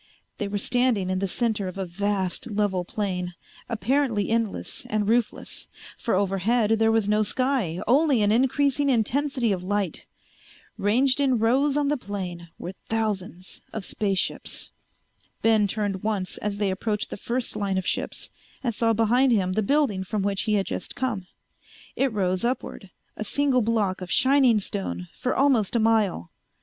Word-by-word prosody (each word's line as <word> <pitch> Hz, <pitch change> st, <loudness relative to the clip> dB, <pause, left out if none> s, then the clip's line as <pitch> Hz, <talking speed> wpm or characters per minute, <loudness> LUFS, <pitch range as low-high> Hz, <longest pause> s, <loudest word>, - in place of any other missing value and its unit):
They 205 Hz, -, -1 dB
were 205 Hz, +1 st, -2 dB
standing 235 Hz, -4 st, +1 dB
in 185 Hz, -, 0 dB
the 195 Hz, -, 0 dB
center 215 Hz, -1 st, 0 dB
of 185 Hz, -, -6 dB
a 190 Hz, -, -2 dB
vast 190 Hz, +3 st, -2 dB
level 205 Hz, -3 st, 0 dB
plain, 180 Hz, -2 st, -3 dB, 0.3 s
apparently 230 Hz, -1 st, 0 dB
endless 230 Hz, -3 st, -1 dB
and 210 Hz, -1 st, 0 dB
roofless, 235 Hz, +1 st, -1 dB, 0.3 s
for 230 Hz, -, -1 dB
overhead 200 Hz, +4 st, +1 dB
there 225 Hz, 0 st, +4 dB
was 225 Hz, -2 st, +2 dB
no 210 Hz, +1 st, +3 dB
sky, 235 Hz, -7 st, 0 dB
only 270 Hz, -2 st, +4 dB
an 205 Hz, -, +3 dB
increasing 275 Hz, +4 st, +2 dB
intensity 255 Hz, 0 st, +1 dB
of 185 Hz, -2 st, -1 dB
light. 195 Hz, -3 st, -2 dB, 0.7 s
Ranged 255 Hz, +7 st, +2 dB
in 265 Hz, -3 st, +3 dB
rows 265 Hz, +6 st, +2 dB
on 290 Hz, -1 st, +1 dB
the 295 Hz, -, +1 dB
plain 180 Hz, -6 st, -6 dB
were 180 Hz, -, -6 dB, 0.2 s
thousands 195 Hz, -5 st, -3 dB
of 220 Hz, -4 st, -4 dB
space 200 Hz, -2 st, -1 dB
ships. -, -, -3 dB, 0.7 s
Ben 220 Hz, -2 st, +4 dB
turned 200 Hz, -2 st, -2 dB
once 205 Hz, -4 st, -1 dB
as 205 Hz, -1 st, -2 dB
they 205 Hz, -2 st, +1 dB
approached 210 Hz, +2 st, -2 dB
the -, -, -3 dB
first 240 Hz, +4 st, -3 dB
line 195 Hz, -2 st, -1 dB
of 190 Hz, -, -2 dB
ships -, -, -2 dB, 0.3 s
and 240 Hz, -3 st, 0 dB
saw 225 Hz, +1 st, +2 dB
behind 240 Hz, +4 st, +3 dB
him 190 Hz, -5 st, +2 dB
the 215 Hz, -, +1 dB
building 215 Hz, -5 st, +1 dB
from 200 Hz, +1 st, -2 dB
which 200 Hz, -1 st, 0 dB
he 210 Hz, -, +3 dB
had 195 Hz, -2 st, +1 dB
just -, -, -4 dB
come. 225 Hz, -8 st, -2 dB, 0.7 s
It 270 Hz, -1 st, +1 dB
rose 185 Hz, -2 st, 0 dB
upward, 235 Hz, -5 st, -3 dB, 0.3 s
a -, -, -4 dB
single 270 Hz, +3 st, +2 dB
block 210 Hz, -4 st, 0 dB
of 180 Hz, -, -6 dB
shining 260 Hz, -, +4 dB
stone, 90 Hz, -, -3 dB
for 255 Hz, -, -1 dB
almost 255 Hz, -7 st, +2 dB
a -, -, +4 dB
mile. 215 Hz, -, +1 dB
215 Hz, 165 wpm, -25 LUFS, 195-245 Hz, 0.7 s, there